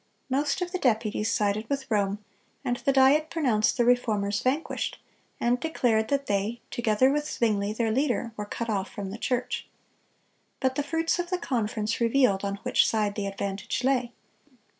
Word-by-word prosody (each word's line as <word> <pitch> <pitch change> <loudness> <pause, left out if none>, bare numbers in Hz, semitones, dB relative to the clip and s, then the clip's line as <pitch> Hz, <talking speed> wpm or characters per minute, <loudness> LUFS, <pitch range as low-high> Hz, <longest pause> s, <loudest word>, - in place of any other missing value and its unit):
Most 290 +7 +1
of 355 - -5
the 370 - -2
deputies 220 -3 +1
sided 210 +1 0
with 275 -3 -3
Rome, 205 0 0 0.4
and 245 -1 0
the 275 - +1
Diet 275 +4 +4
pronounced 250 -11 +1
the 240 - +3
Reformers 210 -5 +2
vanquished, 275 +6 -1 0.4
and 245 +1 +2
declared 240 -8 +1
that 280 +1 0
they, 205 +3 -1
together 240 +2 +3
with 295 +1 -1
Zwingle, 210 -3 0
their 225 -1 0
leader, 245 -1 0
were 210 -1 -5
cut 230 +2 -4
off 200 -3 -1
from 195 -2 -6
the 215 - -7
church. 250 0 -2 0.9
But 260 -2 +1
the 290 - -1
fruits 325 +4 0
of 350 0 -2
the 365 - 0
conference 225 -7 -2
revealed 230 -5 +3
on 200 0 -1
which - - +3
side 210 -2 +1
the 205 -1 -3
advantage 195 +4 -3
lay. 255 -2 +1
235 Hz, 170 wpm, -27 LUFS, 210-270 Hz, 0.9 s, Diet